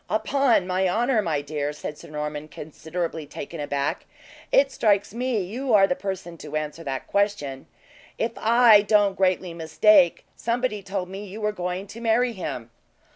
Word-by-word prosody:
"Upon 230 -1 +2
my 185 0 +1
honor, 235 +4 +2
my 155 -7 -1
dear," 145 0 -3
said 150 0 -6
Sir - - -13
Norman, 150 0 -4
considerably 160 +1 -5
taken 160 +3 -8
aback, 145 -1 -2 0.4
"it 275 0 +4
strikes 205 -5 +1
me 245 -1 -1
you 235 +6 0
are 195 -1 +7
the 180 - 0
person 190 -4 -6
to 150 0 -7
answer 155 +2 -3
that 135 -3 -4
question. 200 -10 -1 0.5
If 225 - -1
I 230 -2 +6
don't 205 -1 +3
greatly 185 -2 +1
mistake, 170 +3 +4
somebody 235 -2 -1
told 190 -1 -4
me 195 +3 -7
you 200 +3 -8
were 210 -1 0
going 180 -1 -4
to 220 +3 -11
marry 235 +1 +2
him." 130 - -6
190 Hz, 165 wpm, -24 LUFS, 155-215 Hz, 0.5 s, are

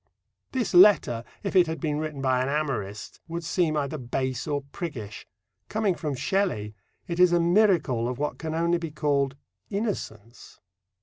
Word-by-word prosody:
This 250 -6 -1
letter, 175 - +6 0.2
if 195 - -3
it 180 -2 +6
had 160 -1 -3
been 150 0 -1
written 155 -3 -4
by 130 -1 +2
an 130 - -1
amorist, 120 -9 -3
would 170 +1 -5
seem 160 -1 +1
either 145 +1 -2
base 130 +1 -3
or 145 -2 -1
priggish. 125 - -6 0.4
Coming 210 -2 +1
from 150 -4 -3
Shelley, 135 - -1 0.3
it 170 0 -3
is 180 -1 +6
a 175 - +4
miracle 170 - +3
of 125 - -4
what 150 +1 -3
can 160 -1 -4
only 170 +1 +1
be 165 -1 -4
called 140 -3 0 0.3
innocence. 125 - -5
155 Hz, 165 wpm, -26 LUFS, 130-175 Hz, 0.4 s, letter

